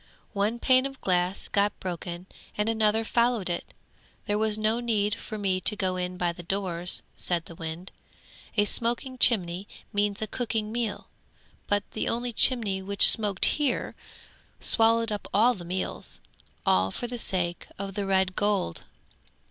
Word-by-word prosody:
One 210 +3 0
pane 255 +2 +3
of 270 -1 -12
glass 180 +1 0
got 205 0 +1
broken 175 -1 -5 0.3
and 210 +1 0
another 220 0 +2
followed 235 -6 +1
it. 175 - -4 0.5
There 210 0 0
was 215 -1 +2
no 215 +2 +1
need 215 -4 0
for 215 - -6
me 190 -2 0
to 210 - +3
go 185 -2 -1
in 180 0 -3
by 175 -1 0
the 175 - -9
doors,' 180 -1 -1
said 170 -2 -1
the - - -11
wind. 165 +3 -6 0.7
'A 205 - +4
smoking 240 +4 -1
chimney 190 -5 +3 0.3
means 205 0 0
a 220 - -1
cooking 215 -1 -2
meal, 230 -2 -3 0.6
but 205 0 +1
the - - -2
only 240 +1 -2
chimney 215 -7 +4
which 200 +1 +6
smoked 205 -4 +2
here 290 -4 0 0.7
swallowed 230 0 +3
up 205 -1 -4
all 235 +5 +5
the 185 -7 -9
meals, 185 +2 -2 0.5
all 95 +1 +3
for 240 - -5
the 240 0 -5
sake 175 -4 -2
of 195 0 -5
the 200 0 -3
red 190 -1 +2
gold. 205 - -1
205 Hz, 160 wpm, -27 LUFS, 185-225 Hz, 0.7 s, which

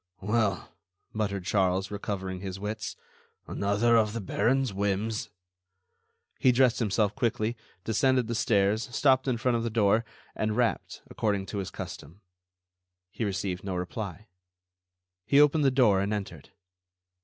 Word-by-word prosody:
"Well?" 105 0 0 0.4
muttered 100 -4 -2
Charles, 95 -1 +1
recovering 95 -2 -4
his 95 0 -6
wits, 105 +2 -4 0.5
"another 105 +4 +2
of 105 -1 +2
the 115 - -3
Baron's 125 +4 0
whims." 100 +2 -1 1.1
He 130 - +5
dressed 125 -1 +3
himself 105 -2 +1
quickly, 120 -3 -1 0.3
descended 125 +4 +2
the 115 - -3
stairs, 110 +1 +1
stopped 135 -1 +3
in 125 -2 +1
front 120 +1 +1
of 115 - -2
the 115 - -1
door, 110 0 +3 0.3
and 110 +1 -1
rapped, 120 -2 -1
according 100 -3 -1
to 100 - -2
his 95 - -4
custom. 85 +8 -9 0.9
He 115 - -4
received 95 -3 -2
no 95 -2 -3
reply. 100 +2 -5 1.0
He 140 +9 +4
opened 150 +1 +5
the - - +6
door 120 -7 +4
and 100 +1 -1
entered. 95 -8 -5
105 Hz, 140 wpm, -28 LUFS, 100-120 Hz, 1.1 s, the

